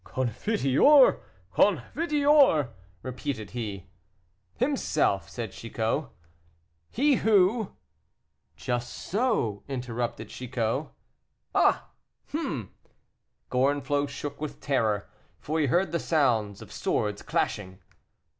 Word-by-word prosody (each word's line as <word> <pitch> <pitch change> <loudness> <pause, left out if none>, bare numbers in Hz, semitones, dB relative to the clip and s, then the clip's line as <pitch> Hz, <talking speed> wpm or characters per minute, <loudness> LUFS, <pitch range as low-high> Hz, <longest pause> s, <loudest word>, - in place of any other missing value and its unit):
"Confiteor, 145 - +4 0.3
confiteor," 280 - +3 0.3
repeated 130 -4 -5
he. 105 -6 -5 0.7
"Himself," 240 - 0
said 115 -5 -5
Chicot. 115 +5 -2 0.8
"He 275 +1 +3
who 210 +1 +3 0.4
" - - -49
"Just 120 0 -3
so," 200 - -1
interrupted 125 -3 -4
Chicot. 115 -3 -2 0.7
"Ah, - - +3 0.4
ah!" - - -2 0.8
Gorenflot 140 +2 +1
shook 140 +1 -6
with 155 - -5
terror, 110 -7 0 0.3
for 155 +2 -2
he 150 - +2
heard 175 +6 +2
the 170 - 0
sounds 115 -12 +1
of - - -14
swords 105 -1 -1
clashing. 95 0 -2
135 Hz, 90 wpm, -27 LUFS, 115-190 Hz, 0.8 s, Confiteor